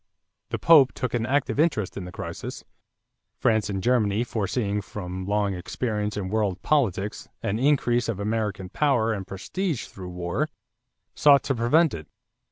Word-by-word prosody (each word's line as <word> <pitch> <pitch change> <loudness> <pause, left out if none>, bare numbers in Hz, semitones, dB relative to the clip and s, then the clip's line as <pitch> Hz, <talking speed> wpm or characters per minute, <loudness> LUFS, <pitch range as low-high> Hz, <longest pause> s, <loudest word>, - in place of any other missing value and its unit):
The - - -2
Pope 150 -6 +6
took 130 - -3
an 120 -1 0
active 140 +1 0
interest 145 - +1
in 95 - -5
the 90 - -8
crisis. - - -6 0.7
France 110 -2 +2
and 95 -2 -3
Germany, 110 -3 +2
foreseeing 105 -2 -1
from 95 -1 -6
long 100 -1 +1
experience 105 +3 -3
in 95 -2 -3
world 100 -3 0
politics 105 - 0
an 105 +3 -1
increase 120 -4 +2
of 105 -4 -2
American 105 -3 -2
power 120 -6 +2
and 95 -3 -5
prestige 160 - -3
through 90 -2 -9
war, 90 - -2 0.7
sought 140 -2 +5
to 135 - 0
prevent 145 +8 +3
it. 75 -2 -7
110 Hz, 155 wpm, -25 LUFS, 100-125 Hz, 0.7 s, Pope